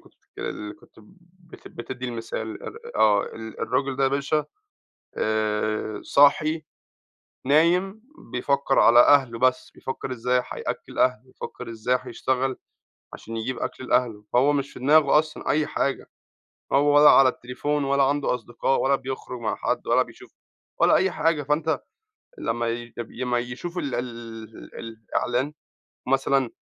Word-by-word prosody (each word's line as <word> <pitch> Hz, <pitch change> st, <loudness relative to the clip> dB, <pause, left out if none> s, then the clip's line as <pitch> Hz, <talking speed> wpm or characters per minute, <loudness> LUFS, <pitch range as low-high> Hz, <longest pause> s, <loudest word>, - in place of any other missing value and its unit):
كنت -, -, -22 dB
بتكل -, -, -12 dB
اللي 105 Hz, 0 st, -6 dB
كنت -, -, -22 dB, 0.4 s
بت 170 Hz, -1 st, -14 dB
بتدي 125 Hz, +1 st, -7 dB
المثال 115 Hz, -2 st, -5 dB
ار -, -, -8 dB, 0.2 s
آه، 105 Hz, -2 st, +4 dB
ال 110 Hz, -1 st, -9 dB
الراجل 130 Hz, +1 st, -1 dB
ده 135 Hz, -, 0 dB
يا -, -, +4 dB
باشا 140 Hz, +2 st, 0 dB, 0.7 s
آآ 110 Hz, 0 st, -1 dB
صاحي، 155 Hz, +3 st, +4 dB, 0.8 s
نايم، 180 Hz, +8 st, +3 dB, 0.3 s
بيفكر 135 Hz, +2 st, +1 dB
على 120 Hz, +1 st, +7 dB
أهله 130 Hz, -4 st, +5 dB
بس، 130 Hz, 0 st, +1 dB
بيفكر 130 Hz, 0 st, -5 dB
إزاي 125 Hz, +1 st, 0 dB
هيأكل -, -, -5 dB
أهله، 125 Hz, 0 st, +3 dB
بيفكر 125 Hz, -1 st, -9 dB
إزاي 115 Hz, +3 st, 0 dB
هيشتغل 130 Hz, 0 st, -2 dB, 0.6 s
عشان 115 Hz, 0 st, -8 dB
يجيب 120 Hz, +3 st, -3 dB
أكل 130 Hz, -, -5 dB
لأهله، 115 Hz, -4 st, +1 dB
فهو 135 Hz, +4 st, +4 dB
مش 140 Hz, -1 st, -2 dB
في -, -, -10 dB
دماغه 145 Hz, +2 st, +5 dB
أصلًا 155 Hz, 0 st, -3 dB
أي 150 Hz, +1 st, +2 dB
حاجة، 140 Hz, -, -2 dB, 0.6 s
هو 145 Hz, +1 st, +4 dB
ولا 150 Hz, 0 st, +9 dB
على 135 Hz, -1 st, +7 dB
التليفون 140 Hz, +4 st, -2 dB
ولا 140 Hz, 0 st, +2 dB
عنده 140 Hz, -1 st, +1 dB
أصدقاء 120 Hz, +2 st, -1 dB
ولا 140 Hz, +1 st, +3 dB
بيخرج 130 Hz, -2 st, -6 dB
مع 110 Hz, -2 st, -1 dB
حد -, -, -2 dB
ولا -, -, +4 dB
بيشوف -, -, -13 dB, 0.5 s
ولا -, -, +5 dB
أي 190 Hz, 0 st, +2 dB
حاجة، 165 Hz, -3 st, +1 dB
فأنت 150 Hz, +3 st, 0 dB, 0.6 s
لمّا 120 Hz, -, -1 dB
ي 120 Hz, 0 st, -5 dB
يب 120 Hz, -, -6 dB
لمّا 125 Hz, -1 st, -1 dB
يشوف 130 Hz, +9 st, -6 dB
ال 145 Hz, -6 st, -2 dB
ال 115 Hz, -2 st, -8 dB
الإعلان 120 Hz, +5 st, -3 dB, 0.5 s
مثلًا 135 Hz, -1 st, +1 dB
130 Hz, 145 wpm, -24 LUFS, 120-145 Hz, 0.8 s, ولا